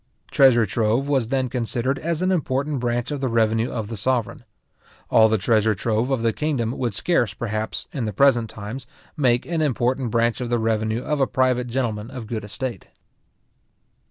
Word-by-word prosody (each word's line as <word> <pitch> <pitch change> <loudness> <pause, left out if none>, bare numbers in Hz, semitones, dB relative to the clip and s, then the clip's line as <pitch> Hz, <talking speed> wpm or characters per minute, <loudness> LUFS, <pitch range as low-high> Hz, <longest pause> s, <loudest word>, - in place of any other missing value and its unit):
Treasure 130 -5 +5
trove 115 +5 0
was 135 -5 +1
then 130 +1 0
considered 125 +2 -2
as 170 +1 -2
an 185 - +2
important 140 -4 -1
branch 120 +2 -1
of 145 -2 -3
the 135 - 0
revenue 115 0 +1
of 110 -3 -4
the 115 - -5
sovereign. 125 +4 -1 0.7
All 110 0 +6
the 110 - +2
treasure 110 +1 +2
trove 110 +4 -1
of 130 -4 0
the 115 -1 +2
kingdom 135 -7 -1
would 120 -6 -1
scarce, 120 - +1
perhaps, 110 -1 -3
in 130 -6 -2
the 105 - -2
present 120 0 +3
times, 110 +6 -7 0.3
make 125 -5 +2
an 170 -2 -1
important 130 -3 0
branch 115 +2 +1
of 120 - -3
the 120 - +1
revenue 110 +1 0
of 150 -2 -1
a 135 - +3
private 125 -1 +1
gentleman 115 -3 -2
of 130 -3 -7
a - - -10
good 110 -1 -4
estate. 115 0 -5
120 Hz, 185 wpm, -23 LUFS, 110-135 Hz, 0.7 s, All